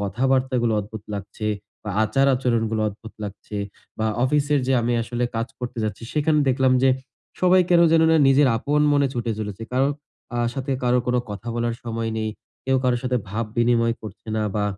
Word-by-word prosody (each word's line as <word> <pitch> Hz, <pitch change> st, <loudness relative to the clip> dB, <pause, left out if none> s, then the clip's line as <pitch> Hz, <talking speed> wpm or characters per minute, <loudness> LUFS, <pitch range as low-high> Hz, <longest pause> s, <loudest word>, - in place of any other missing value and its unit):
কথাবার্তাগুলো 125 Hz, +2 st, +1 dB
অদ্ভুত 105 Hz, +1 st, -8 dB
লাগছে 100 Hz, +2 st, -6 dB, 0.4 s
বা 105 Hz, -, -3 dB
আচার-আচরণগুলো 120 Hz, -3 st, +1 dB
অদ্ভুত 110 Hz, +2 st, -11 dB
লাগছে 105 Hz, +1 st, -7 dB, 0.4 s
বা 110 Hz, -, 0 dB, 0.2 s
অফিসের 145 Hz, +1 st, +2 dB
যে 135 Hz, -, +2 dB
আমি 120 Hz, +1 st, 0 dB
আসলে 120 Hz, +1 st, -2 dB
কাজ 115 Hz, +1 st, -1 dB
করতে 125 Hz, -1 st, -5 dB
যাচ্ছি 110 Hz, -, -4 dB
সেখানে 150 Hz, 0 st, +2 dB
দেখলাম 130 Hz, 0 st, +3 dB
যে, 135 Hz, -, +5 dB, 0.5 s
সবাই 185 Hz, 0 st, +5 dB
কেনো 170 Hz, -1 st, +6 dB
যেন 165 Hz, 0 st, +5 dB
না, 160 Hz, -, +5 dB
নিজের 135 Hz, +1 st, +5 dB
আপন 145 Hz, +5 st, 0 dB
মনে 145 Hz, -1 st, +3 dB
ছুটে 120 Hz, -1 st, -1 dB
চলেছে। 105 Hz, 0 st, -5 dB
কারো 130 Hz, +2 st, +3 dB, 0.5 s
আ -, -, 0 dB, 0.2 s
সাথে 135 Hz, 0 st, -2 dB
কারো 125 Hz, 0 st, +3 dB
কোনো 125 Hz, 0 st, +2 dB
কথা 105 Hz, +3 st, -6 dB
বলার 120 Hz, 0 st, 0 dB
সময় 115 Hz, -1 st, -2 dB
নেই। 110 Hz, 0 st, -1 dB, 0.3 s
কেউ 135 Hz, 0 st, +2 dB
কারো 125 Hz, -1 st, +3 dB
সাথে 125 Hz, -1 st, 0 dB
ভাব 110 Hz, +4 st, -2 dB
বিনিময় 115 Hz, -1 st, +3 dB
করছে 110 Hz, +1 st, -10 dB
না 110 Hz, -, 0 dB
বা 105 Hz, -, +1 dB
120 Hz, 180 wpm, -23 LUFS, 110-135 Hz, 0.5 s, কেনো